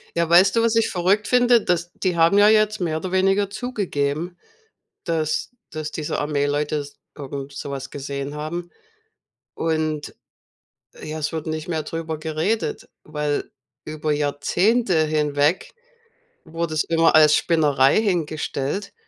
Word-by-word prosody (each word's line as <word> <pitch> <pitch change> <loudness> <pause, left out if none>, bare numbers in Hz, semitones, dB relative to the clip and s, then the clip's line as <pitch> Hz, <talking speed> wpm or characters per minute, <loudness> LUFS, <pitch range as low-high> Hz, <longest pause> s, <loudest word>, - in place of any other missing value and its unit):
Ja, 170 -1 +1
weißt 185 +3 +5
du, 230 - +3
was 230 -1 +2
ich 225 - +2
verrückt 195 +3 +1
finde? 245 -2 +4
Dass 175 0 -1
die 185 -2 -1
haben 165 +4 +4
ja 205 0 +7
jetzt 215 0 +3
mehr 160 -3 -1
oder 180 +3 -5
weniger 195 +1 +2
zugegeben, 180 - -3 0.7
dass 160 -3 -1 0.2
dass 155 -1 -5
diese 155 -2 -4
Armeeleute 145 0 0
s 145 -1 -6 0.2
irgend 140 -1 -7
so 140 - -6
was 135 -1 -6
gesehen 140 0 -5
haben 170 +4 -5 0.8
und, 155 -2 -2 0.9
ja, 155 0 -5
es 150 - -2
wird 160 -1 -4
nicht 155 0 -4
mehr 160 -3 -2
drüber 160 0 -4
geredet, 160 - -2 0.2
weil 150 -1 -3 0.3
über 155 0 -3
Jahrzehnte 175 +6 +1
hinweg 150 +1 0 0.7
wurde 165 -1 -4
es 155 - +1
immer 165 0 +3
als 150 -1 +7
Spinnerei 145 -1 +3
hingestellt. 165 -1 -2
160 Hz, 140 wpm, -22 LUFS, 150-185 Hz, 0.9 s, ja